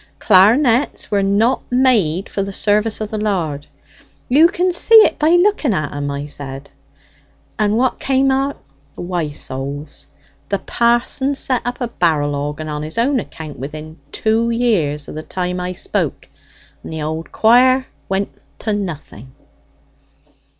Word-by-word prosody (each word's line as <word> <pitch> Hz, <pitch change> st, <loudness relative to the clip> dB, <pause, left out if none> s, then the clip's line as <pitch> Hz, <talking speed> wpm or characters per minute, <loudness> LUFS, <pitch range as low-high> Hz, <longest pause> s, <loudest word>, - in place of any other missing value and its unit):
Clar'nets 230 Hz, +7 st, +3 dB
were 200 Hz, -1 st, +2 dB
not 205 Hz, +6 st, +2 dB
made 220 Hz, -10 st, +2 dB
for 200 Hz, -, -3 dB
the 195 Hz, 0 st, -3 dB
service 210 Hz, +2 st, 0 dB
of 215 Hz, -, -3 dB
the 215 Hz, -1 st, -4 dB
Lard; 165 Hz, -9 st, -2 dB, 0.6 s
you 300 Hz, +6 st, +6 dB
can 365 Hz, 0 st, 0 dB
see 455 Hz, -, +4 dB
it 435 Hz, -4 st, +7 dB
by 310 Hz, 0 st, +3 dB
looking 350 Hz, -, +3 dB
at 155 Hz, -3 st, -3 dB
'em,' 145 Hz, 0 st, -3 dB
I 140 Hz, 0 st, -4 dB
said. 140 Hz, -1 st, -7 dB, 0.9 s
And 210 Hz, +1 st, +2 dB
what 255 Hz, +1 st, +1 dB
came 270 Hz, 0 st, +2 dB
o't? 270 Hz, +1 st, 0 dB, 0.4 s
Why, 175 Hz, -3 st, -3 dB
souls, 140 Hz, -, -6 dB, 0.4 s
the 200 Hz, -, +1 dB
parson 240 Hz, +6 st, 0 dB
set 260 Hz, -2 st, 0 dB
up 245 Hz, 0 st, -3 dB
a 245 Hz, -, -1 dB
barrel 155 Hz, -9 st, 0 dB
organ 145 Hz, +2 st, -4 dB
on 150 Hz, -1 st, -4 dB
his 155 Hz, +5 st, -6 dB
own 255 Hz, +3 st, +2 dB
account 155 Hz, -, -8 dB
within 155 Hz, +4 st, -8 dB
two 225 Hz, +1 st, +1 dB
years 190 Hz, -12 st, 0 dB
o' -, -, -8 dB
the 155 Hz, -, -6 dB
time 180 Hz, +2 st, -3 dB
I 180 Hz, 0 st, -3 dB
spoke, 180 Hz, -, -3 dB, 0.6 s
and -, -, -8 dB
the 160 Hz, -1 st, -4 dB
old 160 Hz, +2 st, -4 dB
quire 255 Hz, +3 st, +4 dB, 0.2 s
went 195 Hz, +1 st, -1 dB, 0.3 s
to 215 Hz, -, -1 dB
nothing." 155 Hz, -, -6 dB
200 Hz, 150 wpm, -18 LUFS, 155-245 Hz, 0.9 s, it